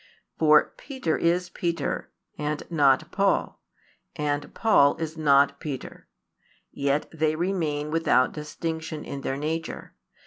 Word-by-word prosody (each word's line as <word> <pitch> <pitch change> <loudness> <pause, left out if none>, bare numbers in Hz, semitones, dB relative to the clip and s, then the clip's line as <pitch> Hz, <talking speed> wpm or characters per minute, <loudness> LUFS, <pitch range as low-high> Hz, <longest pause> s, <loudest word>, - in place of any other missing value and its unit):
For 155 -1 +5
Peter 260 - -2
is 175 +1 +1
Peter, 170 -4 -2 0.3
and 150 0 -3
not 140 -5 +3
Paul, 195 -1 0 0.5
and 145 -1 -2
Paul 145 -11 +4
is 160 -1 -4
not 140 -2 +3
Peter; 140 -4 -7 0.6
yet 140 +1 0
they 155 -1 +1
remain 155 -4 -1
without 155 -6 +3
distinction 160 +1 -5
in 140 - -6
their 135 0 -2
nature. 160 +3 -4
155 Hz, 115 wpm, -26 LUFS, 145-165 Hz, 0.6 s, For